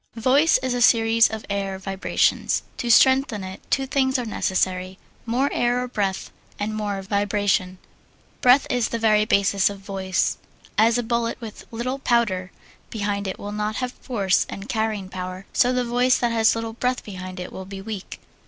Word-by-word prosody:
Voice 265 +7 +4
is 255 -1 0
a 245 - -1
series 225 -1 +5
of 220 -1 -6
air 195 -1 -2
vibrations. 190 0 0
To 240 - -3
strengthen 260 -3 +4
it 185 0 -8
two 270 - +1
things 265 0 +1
are 250 - -3
necessary: 185 -3 -1 0.3
more 250 +5 +1
air 245 +1 +1
or - - -4
breath, 200 -5 -2 0.3
and 210 +1 -3
more 205 -2 -3
vibration. 200 -2 0 0.6
Breath 250 +3 +6
is 245 -2 +1
the 235 - -2
very 215 -2 +3
basis 200 -1 +3
of 200 - -7
voice. 195 -2 -1 0.4
As 225 +2 +4
a 245 - 0
bullet 235 0 -1
with 225 -3 -9
little 250 +4 -3
powder 210 -8 +1 0.4
behind 205 -2 -2
it 190 - -4
will 205 - -6
not 210 +1 -2
have 250 +1 -2
force 200 -8 0
and 195 +1 -7
carrying 220 -5 -2
power, 185 0 -6
so 250 -3 +3
the 250 -1 0
voice 245 +2 +3
that 240 -1 0
has 225 -1 +3
little 225 0 -4
breath 250 +2 -1
behind 185 -2 -8
it 180 - -7
will 190 - -7
be 195 0 -8
weak. 200 -1 -7
215 Hz, 180 wpm, -23 LUFS, 195-240 Hz, 0.6 s, Breath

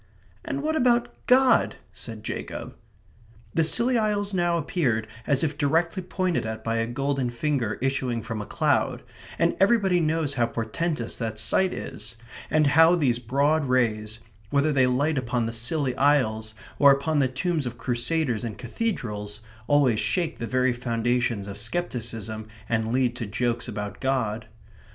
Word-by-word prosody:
"And 290 -4 -3
what 315 +1 0
about 245 -4 +2
God?" 255 0 +4 0.2
said 110 +2 -7
Jacob. - - -6 0.8
The 165 - +3
Scilly 235 +9 +4
Isles 205 -2 0
now 175 -2 +2
appeared 135 -9 0 0.2
as 140 +1 +2
if 150 -2 -2
directly 165 +6 +1
pointed 185 -1 -1
at 110 0 -5
by 115 0 -1
a 115 0 0
golden 135 +1 -1
finger 120 -3 -1
issuing 130 -4 -1
from 110 -1 -4
a 105 - -7
cloud; - - +1 0.3
and 170 0 +2
everybody 195 -3 +4
knows 160 -2 0
how 120 -4 +1
portentous 120 +4 -3
that 110 -2 -3
sight 180 - +1
is, 110 +2 -6 0.3
and 155 -1 +3
how 165 +2 +7
these 130 -8 +1
broad 140 +5 +1
rays, 110 -4 0 0.3
whether 145 +3 +2
they 130 -2 +4
light 140 +4 +1
upon 120 -1 -1
the 115 - -3
Scilly 130 +3 0
Isles 110 -6 +2 0.2
or 140 -1 +8
upon 145 +3 +1
the 135 - +3
tombs 150 +2 -1
of 120 0 -6
crusaders 120 +1 -1
in 115 -3 -4
cathedrals, 115 - -3 0.3
always 140 -7 +3
shake 170 -3 -1
the 115 - -3
very 130 0 +2
foundations 120 -2 -1
of 100 0 -7
scepticism 110 - -3 0.2
and 110 -1 0
lead 125 -1 +1
to 115 - -4
jokes 120 +4 -1
about 105 -2 -5
God. 120 -5 -1
130 Hz, 155 wpm, -25 LUFS, 115-160 Hz, 0.8 s, or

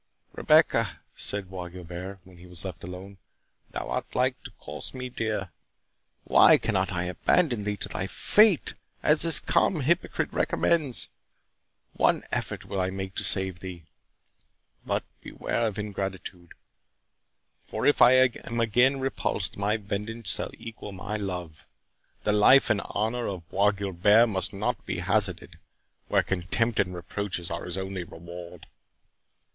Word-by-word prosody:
"Rebecca," - - +3 0.2
said 100 -2 -3
Bois 90 -2 -6
Guilbert, 90 +2 -8
when 90 -1 -17
he 90 - -13
was 90 0 +3
left 90 -3 -7
alone, 95 +3 -9 0.5
"thou - - -5
art - - -4
like 130 0 +1
to - - -8
cost - - -7
me 125 0 -5
dear—Why 110 -6 +1
cannot - - 0
I 90 0 -1
abandon 110 - +1
thee 105 0 -2
to - - -2
thy 95 - -3
fate, 210 - +3 0.3
as 150 +1 +5
this 165 -2 +7
calm 165 -6 +1
hypocrite 170 +7 0
recommends?—One 150 -7 -1
effort - - -3
will 95 - -2
I 95 - 0
make 95 0 -5
to - - -4
save 95 -2 +1
thee—but 90 -3 -9 0.2
beware 115 - -2
of 105 - -5
ingratitude! 95 -4 -6 1.1
for - - -5
if 145 - +3
I 125 - +8
am 120 -1 -2
again 125 +4 +3
repulsed, 130 -6 -2
my 105 +2 0
vengeance 105 0 -2
shall - - +2
equal 110 -3 -9
my 100 +3 -5
love. 90 -8 -5 0.6
The 105 - +1
life 110 +6 +6
and 105 -2 +1
honour 115 +3 -2
of 90 -4 -6
Bois 100 +2 +3
Guilbert 100 +3 +3
must 95 -2 +1
not 105 +3 -3
be - - -4
hazarded, - - -1 0.5
where - - +2
contempt 100 +5 -1
and 90 -2 0
reproaches 90 -1 -4
are 85 - -4
his 90 +1 -1
only 95 -1 -4
reward." 85 +1 -11
100 Hz, 140 wpm, -27 LUFS, 90-115 Hz, 1.1 s, I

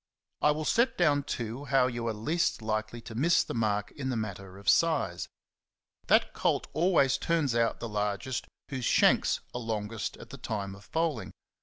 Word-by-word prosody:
I - - +5
will 150 +1 0
set 235 +8 +2
down, 150 -5 +3
too, 120 0 -4
how 135 -1 +3
you 120 -2 -2
are 115 - 0
least 150 +3 0
likely 110 +1 -2
to 115 - -9
miss 165 +10 +3
the - - -6
mark 105 -3 0
in 130 -2 -4
the 125 - -1
matter 100 -3 -5
of 100 - -14
size. 100 - +2 0.8
That - - +4
colt - - +1
always 160 -6 +3
turns 160 -7 +1
out 115 0 +1
the 115 - -4
largest 105 +4 -2 0.2
whose 130 -3 -3
shanks - - +4
are 125 - -4
longest 110 -1 -3
at - - -12
the - - -9
time 100 -3 -3
of 95 +1 -14
foaling. 160 -7 -2
120 Hz, 180 wpm, -29 LUFS, 110-145 Hz, 0.8 s, I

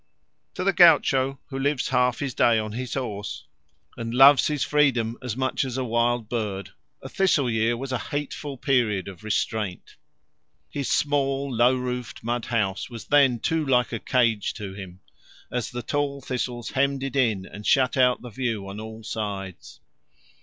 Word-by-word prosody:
To - - -3
the 195 +1 +2
gaucho 135 -7 +5
who 135 -1 -4
lives 140 -1 0
half 125 -1 +2
his 140 -3 -3
day 115 0 +4
on 110 -1 -2
his 125 +3 -4
horse 105 - -5 0.5
and 115 0 -5
loves 135 +1 +7
his 150 -2 -1
freedom 125 -6 +2
as 125 -2 -4
much 130 +1 0
as 130 -1 -4
a 130 - -1
wild 120 -1 0
bird, 105 -4 -3 0.3
a - - -6
thistle 150 -3 +2
year 115 +1 +1
was 135 +2 -5
a 125 - -1
hateful 145 -1 -4
period 120 -8 +1
of 95 -2 -10
restraint. 105 -2 -3 0.7
His 140 -4 -3
small, 140 -2 0
low 120 +2 +4
roofed, 125 -2 -5
mud 120 +1 -2
house 105 -4 -1
was 115 -2 -9
then 135 -5 +4
too 160 -1 0
like 125 -4 +2
a 115 - -2
cage 115 -5 +1
to 100 -2 -6
him, 95 -2 -10 0.5
as 125 -2 -2
the 120 0 -6
tall 145 +2 -1
thistles 125 -3 -4
hemmed 140 0 0
it 135 0 -4
in 110 -8 +1
and 105 - -10
shut 130 -2 +3
out 125 -2 +3
the 125 - -8
view 110 -4 -3
on 100 +2 -7
all 110 +1 -8
sides. 100 -4 -6
125 Hz, 175 wpm, -25 LUFS, 110-135 Hz, 0.7 s, loves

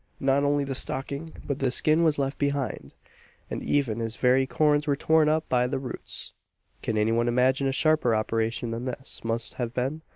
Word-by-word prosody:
Not 135 +1 +2
only 145 0 +2
the 135 -1 -3
stocking, 140 +4 0 0.2
but 140 -1 -3
the 135 - +1
skin 155 +5 +3
was 160 -3 +3
left 140 0 -2
behind 140 -4 -2 0.6
and - - -3
even 125 -6 0
his 115 0 -3
very 130 +2 +3
corns 150 +1 +2
were 145 - +2
torn 160 +1 +3
up 155 +1 0
by 125 -1 +2
the 125 - -2
roots! 130 -2 -7 0.5
Can 110 - -2
any 105 +1 +2
one 120 +1 +1
imagine 130 +3 +2
a - - +1
sharper 150 -4 +2
operation 115 +2 -1
than 115 +2 -4
this 130 +1 -2
must 115 0 -2
have 120 0 -3
been? 135 +5 -2
135 Hz, 195 wpm, -26 LUFS, 120-145 Hz, 0.6 s, skin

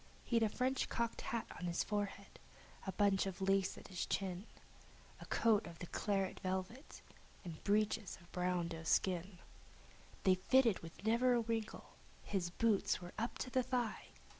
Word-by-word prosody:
He'd 235 -1 +2
a 220 - +4
French 255 +4 0
cocked 235 0 -1
hat 230 -1 -2
on 180 - -4
his 170 - +1
forehead, 205 -1 -3
and - - -20
a - - 0
bunch 195 0 +3
of 190 - -5
lace 195 0 +2
at - - -11
his 180 -3 -3
chin; 190 +1 -2 0.7
He'd - - -17
a - - -7
coat 220 -2 +3
of 170 - -9
the 175 - -6
claret 195 +1 -1
velvet, 190 - -4 0.4
and 165 -3 -7
breeches 210 -1 +1
of 170 - -17
fine 180 -1 0
doe 165 -1 -5
skin. 180 +2 +1 0.9
They 190 - +6
fitted 225 +4 +4
with 165 +3 -11
never 240 +3 +4
a 235 - +3
wrinkle; 225 -1 -3 0.3
his 185 -4 -1
boots 210 +3 +2
were 175 0 -9
up 230 +2 -2
to 255 - -4
his 255 -1 +1
thigh! 245 -4 -1
200 Hz, 175 wpm, -38 LUFS, 180-230 Hz, 0.9 s, They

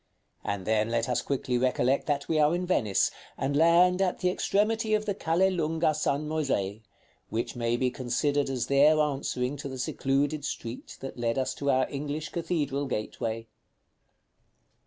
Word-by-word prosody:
And 100 -2 -3
then 110 0 +1
let 115 0 0
us 125 - 0
quickly 130 -3 -1
recollect 130 +1 +1
that 145 -2 -1
we 160 - +1
are 150 +2 +4
in 180 +1 -2
Venice, 110 - +2 0.3
and 140 +1 -1
land 175 +4 +5
at 185 -2 +1
the 180 - +1
extremity 215 +3 +1
of 215 0 -1
the 205 - 0
Calle 190 0 +2
Lunga 160 -2 +1
San 150 -1 -1
Moisè, 130 -10 -1 0.5
which 115 +2 -3
may 120 0 0
be 125 0 +1
considered 135 +3 0
as 125 -3 -1
there 145 +3 +5
answering 140 -2 -1
to 140 0 -6
the 130 - -6
secluded 140 +3 0
street 120 -4 -6
that 135 -2 -7
led 115 +1 0
us 130 - 0
to 140 - -2
our 130 -1 +3
English 145 +2 -4
cathedral 150 -5 -2
gateway. 115 -1 -3
140 Hz, 165 wpm, -28 LUFS, 125-160 Hz, 0.5 s, land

